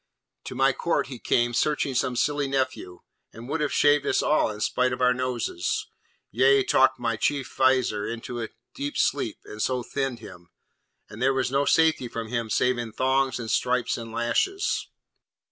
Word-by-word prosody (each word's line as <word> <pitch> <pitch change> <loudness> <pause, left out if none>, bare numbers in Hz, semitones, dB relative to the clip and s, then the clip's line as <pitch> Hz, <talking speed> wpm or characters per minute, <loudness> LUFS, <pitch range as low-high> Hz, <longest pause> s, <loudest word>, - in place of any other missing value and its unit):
To - - -6
my 135 +1 +3
court 170 - -1
he 125 -3 -8
came, 120 +1 +1
searching 145 +1 0
some 125 0 0
silly 145 +2 0
nephew, 130 -9 -3 0.3
and 115 +2 -11
would 155 +3 -2
have 150 - 0
shaved 145 -1 +4
us - - +2
all 155 - +2
in 105 -1 -7
spite 125 +4 +1
of 125 - -4
our 125 0 +4
noses; 125 -8 -2 0.5
yea, 135 +4 +4
talked 130 - +3
my 115 -2 -2
chief 140 +3 -1
Vizier 130 -6 +2
into 115 +1 -5
a 110 - -4 0.3
dead 145 +1 -4
sleep, - - 0
and 105 - -8
so 125 +1 0
thinned 135 -1 -3
him. 90 -6 -13 0.6
And 105 - -11
there 135 +1 +3
was 130 -1 0
no 140 +1 +2
safety 160 -6 +3
from 115 -1 -6
him 115 -2 -2
save 125 +3 +1
in 115 -2 -5
thongs 130 0 +1
and 115 -2 -4
stripes 125 -1 +1
and 115 -1 -7
lashes!' 365 - 0
125 Hz, 180 wpm, -25 LUFS, 115-135 Hz, 0.6 s, shaved